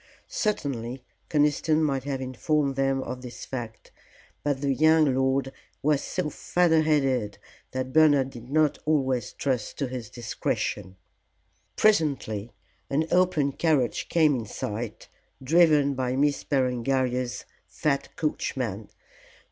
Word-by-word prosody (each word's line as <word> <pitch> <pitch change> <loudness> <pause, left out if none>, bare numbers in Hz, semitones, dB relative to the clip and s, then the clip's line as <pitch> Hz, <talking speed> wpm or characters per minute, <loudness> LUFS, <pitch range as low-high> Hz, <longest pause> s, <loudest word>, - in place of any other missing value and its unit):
Certainly 130 - -2 0.3
Conniston 150 +1 +2
might 135 -3 0
have 135 -2 -3
informed 135 +2 0
them 135 0 +1
of 125 - -6
this 125 -1 -8
fact; 115 -4 -7 0.5
but 145 -2 -1
the 140 -1 +1
young 155 0 +4
lord 130 +1 +1 0.3
was 145 -1 +2
so 185 -3 -2
feather 170 -1 +2
headed 135 -9 +1 0.3
that 130 0 -4
Bernard 145 -4 +5
did 120 0 -11
not 155 0 +2
always 130 -6 +1
trust 130 -6 -2
to 140 - -1
his 125 -4 -6
discretion. 105 -5 -3 0.8
Presently 140 - +1 0.4
an 150 +3 +1
open 180 -6 +3
carriage 140 -5 0
came 160 -3 +4
in 115 -4 -4
sight 105 +3 -5 0.4
driven 150 -1 +4
by 130 -1 -1
Miss 145 +1 +1
Berengaria's 125 -1 0 0.2
fat 140 -2 -2
coachman. 120 -8 -3
135 Hz, 120 wpm, -26 LUFS, 125-150 Hz, 0.8 s, Bernard